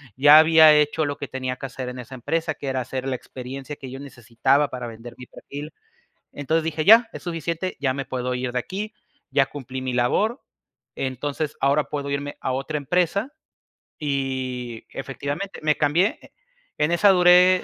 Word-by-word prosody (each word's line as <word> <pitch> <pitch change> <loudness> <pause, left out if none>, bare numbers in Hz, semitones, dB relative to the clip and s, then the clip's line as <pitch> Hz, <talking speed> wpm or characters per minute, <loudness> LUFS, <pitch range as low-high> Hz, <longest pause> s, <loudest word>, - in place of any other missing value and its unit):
ya 145 +3 +8
había 160 -1 +7
hecho 150 +1 +2
lo 145 0 -3
que 140 - -6
tenía 130 -1 -4
que - - -7
hacer 130 -1 -6
en 125 0 -8
esa 125 +2 -9
empresa, 160 +6 -2
que 140 - -8
era 130 -1 -1
hacer 130 +1 -4
la 130 -2 -1
experiencia 135 +4 -8
que 135 -3 -9
yo 135 - -7
necesitaba 135 +2 0
para 125 -2 -5
vender 115 +1 -10
mi 125 - -10
perfil. 145 +4 -9 0.6
Entonces 155 +3 -1
dije: 160 -1 -2
"Ya, 225 +5 +7
es - - -9
suficiente, 170 +1 -3
ya 130 -2 0
me 140 0 -4
puedo 125 -1 -3
ir 125 0 -2
de 125 - -1
aquí, 195 - -5 0.4
ya 135 -1 +3
cumplí 130 -2 -7
mi 130 -1 -3
labor. 200 - +1 0.5
Entonces 145 +3 -3
ahora 140 +2 +3
puedo 140 -1 -4
irme 140 0 -3
a - - -2
otra 135 +4 -2
empresa", 180 - 0 0.7
y, 130 -4 -3
efectivamente, 145 +8 -5
me 155 -1 +2
cambié, 160 +8 +2
eh, - - -17 0.5
en 150 +2 +1
esa 175 +4 +4
duré 180 0 +6
140 Hz, 180 wpm, -23 LUFS, 130-160 Hz, 0.7 s, ya